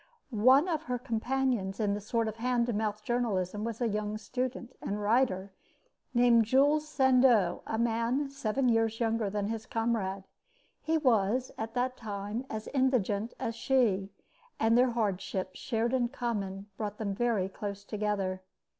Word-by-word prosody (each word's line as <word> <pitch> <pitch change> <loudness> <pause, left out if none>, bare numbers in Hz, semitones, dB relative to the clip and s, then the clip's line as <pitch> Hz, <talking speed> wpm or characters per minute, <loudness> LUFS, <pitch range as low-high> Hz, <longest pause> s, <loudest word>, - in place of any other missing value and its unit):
One 255 - +5
of 320 -4 0
her 250 0 -1
companions 240 -4 -1
in 205 -2 +1
this 205 0 -5
sort 230 -1 +1
of 220 0 -4
hand 240 0 +1
to 240 - -2
mouth 210 0 -2
journalism 210 -5 -1
was 230 -1 -4
a 240 - +2
young 210 0 -2
student 250 +1 -4
and 205 +1 -3
writer 205 -3 +1 0.6
named 240 -2 +5
Jules 290 +6 +3
Sandeau, 255 - +4
a 220 - -2
man 235 +5 0
seven 270 -1 0
years 225 -1 +2
younger 225 -3 0
than 205 0 -2
his 225 -1 -4
comrade. 220 -4 -1 0.6
He 320 0 +1
was 250 -3 +2
at 225 +1 -5
that 255 +1 0
time 210 +3 -5
as 215 0 -5
indigent 240 -5 +1
as 230 - -2
she, 220 -7 +1 0.5
and 225 +1 +3
their 250 +1 +5
hardships, 195 -4 -2
shared 235 0 -1
in 250 -2 +2
common, 200 -6 -3
brought 210 -1 -4
them 205 -3 -2
very 220 -3 +1
close 200 +1 -6
together. 200 -3 -2
225 Hz, 155 wpm, -30 LUFS, 205-250 Hz, 0.6 s, One